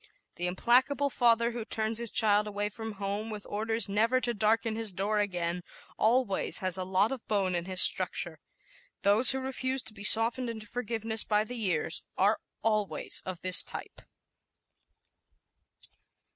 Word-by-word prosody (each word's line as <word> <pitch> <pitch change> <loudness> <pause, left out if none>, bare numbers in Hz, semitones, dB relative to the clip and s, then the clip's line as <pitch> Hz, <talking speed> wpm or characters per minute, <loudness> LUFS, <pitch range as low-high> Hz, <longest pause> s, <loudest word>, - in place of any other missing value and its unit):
The 175 +1 -3
implacable 255 +9 +2
father 235 -1 +3
who 235 -1 -6
turns 220 +1 -2
his 235 -1 -2
child 210 -1 +3
away 205 0 -3
from 220 +1 -7
home, 200 +2 -4
with 210 -2 -7
orders 225 +1 -2
"never 225 +6 +1
to 240 -2 -2
darken 220 +1 0
his 225 -2 -2
door 200 +3 -2
again," 180 -3 -2 0.3
always 225 -3 +1
has 185 -2 0
a 185 - -2
lot 190 +4 +1
of 265 -4 -7
bone 195 -3 0
in 175 -1 -3
his 185 0 +2
structure. - - +2 0.6
Those 205 +5 +6
who 265 - +7
refuse 260 -1 -3
to 220 -1 -8
be 200 -1 -11
softened 230 +3 +4
into 220 -2 -7
forgiveness 225 -1 -1
by 210 0 +1
the 245 +3 -8
years 180 -8 -1
are 205 +3 +2 0.2
always 215 -2 -1
of 185 -2 -6
this 185 0 +4
type. - - -8
215 Hz, 160 wpm, -29 LUFS, 200-230 Hz, 0.6 s, who